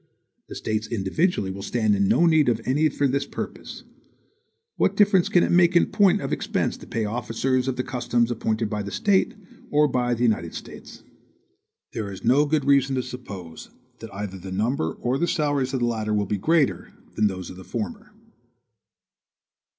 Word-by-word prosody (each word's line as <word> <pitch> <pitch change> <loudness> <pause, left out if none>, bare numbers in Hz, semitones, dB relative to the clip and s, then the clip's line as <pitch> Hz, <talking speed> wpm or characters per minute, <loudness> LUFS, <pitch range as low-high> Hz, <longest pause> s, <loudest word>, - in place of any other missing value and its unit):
The - - -7
States 110 0 -2
individually 105 - 0
will 100 +1 -7
stand 110 0 +1
in 100 0 +2
no 170 - +4
need 160 -5 +4
of 115 -2 +1
any 150 +4 +2
for 145 0 0
this 140 +1 -1
purpose. - - -7 0.9
What - - +1
difference 200 -4 +4
can 175 - +4
it - - 0
make 175 0 +4
in 170 - +6
point 200 -3 +3
of - - -3
expense - - -1
to - - -13
pay 110 -1 -2
officers 125 +3 -1
of 130 - -1
the 125 - -2
customs 120 -2 0
appointed 110 -1 -1
by 105 0 -3
the 100 - -5
State 195 - +1 0.3
or 150 0 +4
by 125 -2 0
the 120 - -2
United 95 -8 0
States? - - -10 0.9
There 105 -2 -4
is 95 -1 -9
no 130 +6 +4
good 150 -2 0
reason 140 -1 +3
to 130 - -1
suppose 95 -11 -9 0.3
that - - -9
either 100 -1 -6
the 95 +1 -8
number 105 - -1
or 125 +2 -2
the 170 - +1
salaries 145 -6 0
of 130 -3 -2
the - - +3
latter 110 -2 -1
will 105 -1 +1
be 100 +1 -2
greater 160 - +1 0.2
than 110 - +2
those 95 -3 -5
of - - -10
the 95 - -11
former. 215 - -6
120 Hz, 190 wpm, -24 LUFS, 105-145 Hz, 0.9 s, in